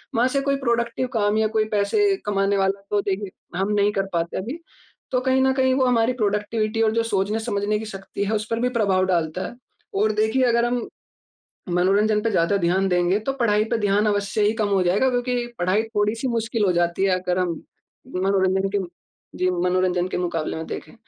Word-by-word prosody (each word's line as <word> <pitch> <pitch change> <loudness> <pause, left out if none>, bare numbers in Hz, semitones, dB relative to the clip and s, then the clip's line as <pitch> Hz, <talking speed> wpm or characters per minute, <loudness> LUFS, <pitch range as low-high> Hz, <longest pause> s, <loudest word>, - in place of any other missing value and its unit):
वहाँ 240 +2 +3
से 275 +2 0
कोई 275 0 +1
प्रोडक्टिव 235 -1 -1
काम 210 -2 +1
या 220 0 +3
कोई 215 - +3
पैसे 220 - +2
कमाने 200 -1 +1
वाला 195 0 0
तो, 205 -1 +2
देखिए, 195 0 -3 0.3
हम 195 +2 0
नहीं 205 0 +3
कर 195 -1 0
पाते 170 0 -1
अभी। 245 - -5 0.5
तो 255 - +2
कहीं 260 0 +2
न 265 0 +3
कहीं, 260 -1 +2
वो 260 -1 +2
हमारी 240 -1 +2
प्रोडक्टिविटी 215 0 -1
और 220 -1 +3
जो 230 0 +1
सोचने-समझने 210 0 -1
की 220 - -6
शक्ति 195 -1 -5
है, 205 - -2
उस 215 0 -2
पर 230 - 0
भी 250 +1 +1
प्रभाव 200 -6 +1
डालता 175 -1 -1
है। - - -10 0.4
और 215 +1 +3
देखिए, 220 +5 +1
अगर 235 -1 +3
हम 240 0 -1 0.9
मनोरंजन 205 +4 +2
पे 225 +1 0
ज़्यादा 185 +1 +2
ध्यान 185 +1 +1
देंगे, 180 +2 +2
तो 245 +5 -2
पढ़ाई 215 -5 +2
पे 235 - +2
ध्यान 205 0 +2
अवश्य 205 0 0
ही 205 - +3
कम 205 - +1
हो 195 -2 +2
जायेगा, 195 +9 +2
क्योंकि 245 -1 -1
पढ़ाई 185 +5 +2
थोड़ी-सी 210 +5 0
मुश्किल 230 -2 0
हो 185 - +3
जाती 175 +2 +1
है, 185 -2 +2
अगर 180 0 -1
हम 180 -1 0 0.6
मनोरंजन 190 0 +1
के - - +1 0.6
जी, 185 - +1
मनोरंजन 180 0 +1
के - - -3
मुकाबले 170 -3 -2
में 160 - -5
देखें। - - -7
205 Hz, 200 wpm, -23 LUFS, 190-230 Hz, 0.9 s, वहाँ